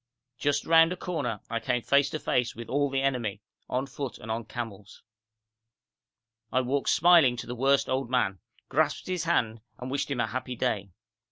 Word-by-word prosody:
Just 145 0 0
round 165 0 +6
a 180 - -3
corner 140 - -3
I 115 0 -2
came 120 0 -1
face 140 0 +3
to - - -3
face 125 -4 0
with 115 0 -8
all 145 +1 +1
the 135 0 -1
enemy, 120 -7 -1 0.3
on 130 +2 -1
foot 135 -1 -6
and 110 - -7
on 115 0 -3
camels. 105 -5 -7 1.5
I 130 - +2
walked 135 +2 0
smiling 165 -7 +5
to - - -5
the 120 - -5
worst 135 +3 +2
old 130 -1 -1
man, 100 -7 +1 0.3
grasped - - 0
his 180 -2 -2
hand, 115 -9 +1 0.2
and 125 +1 -6
wished 140 +1 -1
him 135 -3 -2
a 120 - +2
happy 125 +2 -4
day. 100 -3 -1
130 Hz, 185 wpm, -28 LUFS, 115-140 Hz, 1.5 s, round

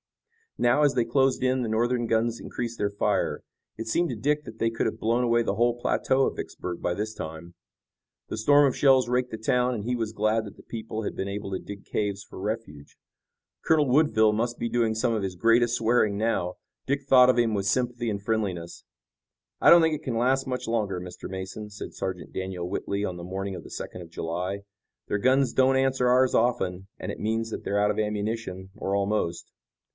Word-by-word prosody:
Now, 120 +4 +3
as 145 -2 +3
they 120 -2 +2
closed 130 +2 +2
in 130 0 +2
the 115 - -2
Northern 120 +2 +1
guns 115 +1 +1
increased 120 -1 -5
their 100 - +1
fire. 100 -1 -1 0.3
It 115 0 -5
seemed 170 +9 +1
to - - -3
Dick 150 +1 0
that 110 - -10
they 115 - +2
could 115 - -1
have 110 - -4
blown 115 +3 +1
away 120 -1 +3
the 100 - -1
whole 120 +2 +2
plateau 130 +2 +2
of - - -2
Vicksburg 90 -1 -6
by 90 - 0
this 110 +2 -3
time. 80 -1 -8 0.7
The - - -4
storm 145 +6 +5
of 130 - -1
shells 135 -3 +4
raked 125 0 0
the 110 - -4
town, 125 +3 +1
and 105 -2 -5
he 125 +1 0
was 115 -2 -2
glad 110 +1 +1
that 100 - -11
the - - -15
people 110 -1 -5
had - - -4
been 95 - -3
able 100 0 -5
to 95 - -2
dig 100 -1 -9
caves 100 -1 -2
for - - -11
refuge. 95 -9 -5 0.7
Colonel 155 -3 +3
Woodville 125 -6 +4
must 120 +2 -1
be 120 - -2
doing 115 -2 +1
some 115 +1 +1
of 110 - -1
his 95 -1 -3
greatest 115 +5 +3
swearing 110 -3 +2
now. 100 -5 0 0.3
Dick 140 +1 0
thought 125 -2 +7
of 125 - +3
him 115 -2 +2
with 100 -1 -1
sympathy 120 0 0
and 100 -2 -3
friendliness. 100 -6 -3 0.8
"I - - +7
don't 170 -1 +8
think 160 -1 +2
it - - -9
can 120 -3 -2
last 130 +3 +2
much 125 -1 -3
longer, 105 -5 -1
Mr. 90 0 -8
Mason," 95 +3 -6
said 105 - -8
Sergeant 95 -2 -5
Daniel 95 -2 -4
Whitley 100 +2 -2
on 90 -3 -4
the 85 - -8
morning 95 +2 -4
of - - -8
the - - -12
second 90 - -6
of 85 - -10
July. 90 +5 -3 0.4
"Their 105 - -1
guns 130 +1 +3
don't 130 +1 +4
answer 130 -1 +2
ours 130 +1 +4
often 95 -6 +1
and - - -4
it - - -8
means 110 +1 -1
that - - -5
they're 100 - 0
out 105 0 +3
of 105 - -3
ammunition, 105 -3 -3
or 95 - -2
almost. 100 -4 -1
110 Hz, 215 wpm, -26 LUFS, 100-125 Hz, 0.8 s, don't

